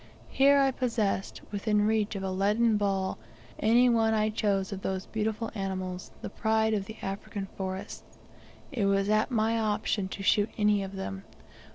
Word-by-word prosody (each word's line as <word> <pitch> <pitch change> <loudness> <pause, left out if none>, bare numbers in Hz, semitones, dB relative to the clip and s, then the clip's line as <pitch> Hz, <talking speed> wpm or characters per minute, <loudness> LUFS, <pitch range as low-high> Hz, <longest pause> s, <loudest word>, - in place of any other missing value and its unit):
Here 280 +1 +5
I 270 -1 +4
possessed, 230 -7 -1
within 210 0 +1
reach 215 -1 +1
of 195 - -4
a 190 - -2
leaden 210 +4 +2
ball, 195 - 0 0.4
any 235 +3 +5
one 225 -2 +3
I 215 0 +1
chose 200 -3 0
of 195 - -6
the 190 -1 -3
beautiful 220 +1 -2
animals, 185 -3 -4
the - - -4
pride 220 0 +1
of 200 -2 -1
the 220 +2 -9
African 195 +1 -4
forests! 190 0 -6 0.5
It 235 -8 0
was 195 0 +2
at 215 +3 +2
my 225 -1 +1
option 210 -2 0
to 195 +1 -7
shoot 205 +2 +3
any 210 -1 +3
of 195 0 -6
them! 95 - -5
210 Hz, 170 wpm, -29 LUFS, 195-220 Hz, 0.5 s, Here